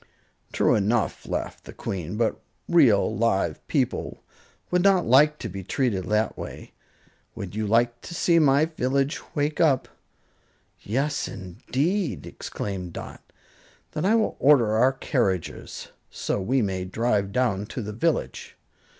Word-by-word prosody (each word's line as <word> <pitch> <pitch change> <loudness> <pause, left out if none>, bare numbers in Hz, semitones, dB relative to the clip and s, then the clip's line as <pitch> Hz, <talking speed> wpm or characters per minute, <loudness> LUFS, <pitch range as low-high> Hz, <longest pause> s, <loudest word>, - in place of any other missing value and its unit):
"True - - +3
enough," 105 -4 0
laughed - - -4
the - - -10
Queen; 95 +1 -5
"but 115 -1 0 0.3
real, 135 -13 +4
live 110 -3 +1
people - - -1 0.5
would 180 0 +3
not 190 -2 +4
like 150 +5 +5
to 120 - -5
be 95 -1 -6
treated 100 -3 -1
that 105 +1 0
way. - - -8 0.6
Would - - -6
you 110 0 -2
like 120 +2 +2
to 170 - -8
see 170 0 +3
my 145 0 +4
village 140 -2 -1
wake 150 +1 0
up?" 140 -6 +3 0.9
"Yes, 140 +7 -1
indeed!" 130 - -2
exclaimed 90 -4 -6
Dot. - - -8 0.7
"Then 155 - -2
I 215 +4 +4
will 220 -1 +1
order 130 -6 +5
our 125 +4 +4
carriages 115 - -2 0.2
so - - -2
we 125 +5 +1
may 95 -2 -2
drive 100 +1 0
down 105 -4 0
to 120 - -5
the 105 +1 -5
village." 160 +8 -2
120 Hz, 140 wpm, -25 LUFS, 100-150 Hz, 0.9 s, like